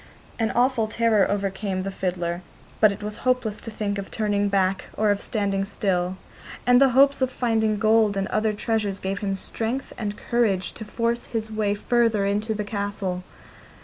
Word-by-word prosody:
An 225 -1 +1
awful 245 -2 +2
terror 220 -2 +2
overcame 195 -1 -2
the 195 - -3
fiddler; 175 -2 -2 0.4
but 215 -1 +6
it 200 - -7
was 210 0 -5
hopeless 250 -4 0
to - - -6
think 205 -2 -2
of 195 - -6
turning 205 -2 0
back 195 -1 +1
or 210 -1 +3
of 200 - -1
standing 200 -3 0
still, 190 -2 -1 0.5
and 245 +1 +6
the 275 - +7
hopes 280 0 +5
of 260 - +3
finding 220 -4 +1
gold 215 -1 +3
and 195 0 0
other 215 0 +1
treasures 210 -2 -1
gave 190 0 -3
him 195 -2 -1
strength 230 +6 -3
and 210 -2 -3
courage 215 -6 0
to 220 - -9
force 235 +2 -1
his 220 -2 -3
way 210 -2 0
further 225 -1 +2
into 210 +2 0
the 210 - -2
castle. 200 -3 -3
210 Hz, 180 wpm, -24 LUFS, 195-225 Hz, 0.5 s, the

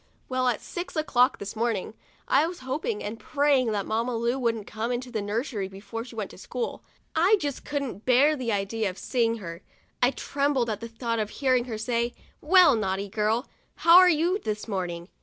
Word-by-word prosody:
Well, 255 0 0
at 240 -3 0
six 350 0 -6
o'clock 255 -5 +3
this 200 +2 -7
morning, 220 -3 -1 0.3
I 290 +4 +4
was 350 -4 -7
hoping 310 - -3
and 220 +2 -5
praying 280 -5 +2
that 200 -2 -1
Mamma 230 +3 -1
Lu 235 +3 0
wouldn't 230 -4 -1
come 220 +3 -3
into 245 +1 -3
the 220 -3 -2
nursery 210 0 -2
before 200 +4 -7
she 245 -1 -12
went 215 -3 -4
to - - -13
school. 245 +5 -4 0.3
I 355 +7 +5
just 285 -5 -4
couldn't 275 -8 -3
bear 270 +5 +4
the 250 -5 -2
idea 205 +1 -1
of 185 - -9
seeing 230 +1 0
her; 170 -4 -8 0.4
I 245 - +5
trembled 275 -3 0
at 210 - -3
the 230 - -6
thought 230 0 -2
of 210 -1 -1
hearing 255 -2 +1
her 230 -4 -4
say: 235 +1 -1
" - - -34
Well, 360 -1 +6
naughty 195 -2 -2
girl, 215 +4 0 0.3
how 335 +1 +7
are 365 -1 +7
you 345 +4 +2
this 215 - -4
morning 175 -4 -3
235 Hz, 200 wpm, -26 LUFS, 215-275 Hz, 0.4 s, how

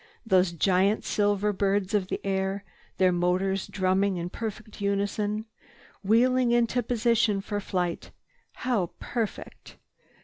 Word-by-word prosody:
Those 190 -4 +3
giant 190 +4 +2
silver 205 0 +1
birds 200 0 0
of 200 -3 +1
the - - -3
air, 195 0 -1 0.3
their 185 -1 +4
motors 185 +2 0
drumming 190 0 +1
in 175 +1 -4
perfect 215 -2 -6
unison, 205 +2 -1 0.6
wheeling 245 +4 +3
into 240 +1 +2
position 230 -3 +1
for 205 +1 -3
flight—how 195 - -4
perfect! 230 -4 -5
200 Hz, 110 wpm, -27 LUFS, 190-220 Hz, 0.6 s, their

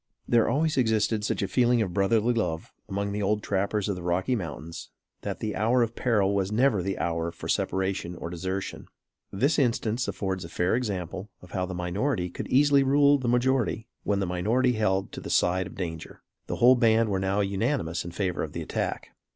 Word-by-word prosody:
There 120 -2 +3
always 155 +1 +1
existed 110 -3 +2
such 110 - -1
a - - 0
feeling 120 +1 +3
of 95 -6 -1
brotherly 110 +5 +2
love 80 -9 -2 0.2
among 100 +1 -2
the 105 +1 -2
old 105 +1 0
trappers 100 +1 0
of 100 - -1
the 90 - -7
Rocky 90 +8 0
Mountains, 85 -4 -6 0.3
that - - -5
the 105 -1 -2
hour 120 +4 +3
of 115 0 -3
peril 105 -5 +2
was 100 0 0
never 110 -3 +3
the 95 +2 -2
hour 85 0 -1
for - - -9
separation 95 -2 -1
or 85 0 -6
desertion. 95 +3 -4 0.4
This 140 +11 +1
instance 120 -2 0
affords 95 -2 -3
a 85 - -8
fair 90 +4 +1
example 95 -4 -3 0.2
how 95 -1 -2
the 95 - -5
minority 90 +2 -1
could - - -6
easily 140 +1 +4
rule 140 +1 +4
the 130 - -3
majority 125 -2 +1
when 100 -1 0
the 100 - 0
minority 110 +9 +1
held 95 -4 0
to - - -7
the - - -7
side 90 +1 +2
of - - -12
danger. 80 -4 -6 0.2
The - - -2
whole 125 +2 +6
band 115 -2 +3
were 95 -1 0
now 95 +2 +1
unanimous 100 - -1
in 85 - -6
favor 90 0 -2
of - - -4
the - - -4
attack. - - -3
100 Hz, 200 wpm, -27 LUFS, 95-120 Hz, 0.4 s, whole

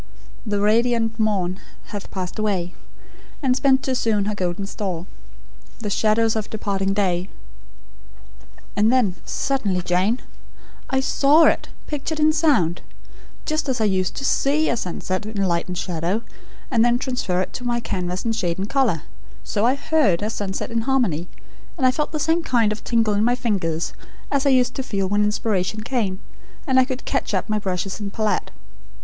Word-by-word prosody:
"'The 205 -1 0
radiant 225 +2 +2
morn 195 -4 0 0.3
hath 205 -1 -5
passed 185 +2 -5
away, 190 -5 0 0.7
And 255 -2 +3
spent 270 0 +3
too 265 - 0
soon 220 -5 +1
her 210 - -1
golden 185 0 -2
store; 185 -4 -4 0.7
The 210 -2 -4
shadows 220 +2 +2
of 215 -1 -2
departing 195 -2 -1
day 185 -2 0 0.7
'" - - -24
"And 210 +3 +4
then 245 -8 +3
suddenly, 205 -10 -1
Jane 185 +8 +1 0.7
I 265 -1 +2
SAW 290 +4 +5
it, - - +3 0.2
pictured 305 +1 -3
in 305 0 +4
sound! 275 - +2 0.6
Just 310 -2 -1
as 255 - 0
I - - +2
used 185 -2 0
to 275 - -4
SEE 295 +4 +2
a - - +2
sunset, 185 0 -3
in 210 -2 -2
light 170 -2 0
and 180 -1 -4
shadow, 180 +6 -1 0.5
and 230 -3 +4
then 240 0 +4
transfer 250 -9 -1
it 185 - -2
to 245 - -6
my 240 -1 0
canvas 180 -4 -3
in 230 - +2
shade 180 -7 -1
and 195 +1 -2
colour, 235 - +1 0.4
so 210 +3 +1
I 255 - +3
heard 275 - +2
a 215 - -1
SUNSET 200 0 -3
in 230 0 +1
harmony, 225 - +1 0.5
and 265 - +1
I 255 - +6
felt 295 +3 -2
the 310 - -2
same 325 +3 +2
kind 235 -8 +2
of 215 - -5
tingle 225 -3 +2
in 205 +1 +2
my 240 +2 +3
fingers 180 -10 -1 0.4
as 280 0 +2
I - - +6
used 255 -2 +3
to - - -3
feel 200 -7 -1
when 205 +2 +2
inspiration 210 -1 0
came, 215 -6 -1 0.5
and 260 -4 +4
I 260 - +5
could 260 0 -5
catch - - -1
up - - -1
my 215 -1 0
brushes 190 0 -3
and 200 -1 -4
palette. 215 0 0
215 Hz, 180 wpm, -22 LUFS, 190-255 Hz, 0.7 s, I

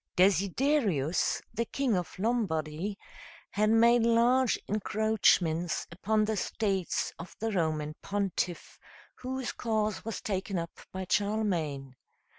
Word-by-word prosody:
Desiderius, 195 - +2
the 230 +1 -1
king 260 -2 0
of 180 -2 -3
Lombardy, 190 -4 -1 0.5
had 215 +1 +2
made 235 +2 +5
large 235 +2 +3
encroachments 200 -6 +1
upon 215 +5 +1
the 220 0 -1
states 195 -2 -1
of 165 - -9
the 225 +1 -2
Roman 155 -5 -1
pontiff, 195 -3 -3 0.4
whose 260 0 -4
cause 215 -2 -1
was 225 0 -4
taken 195 -1 -2
up 170 0 -5
by 190 0 -4
Charlemagne. 175 -12 -1
205 Hz, 110 wpm, -30 LUFS, 175-225 Hz, 0.5 s, made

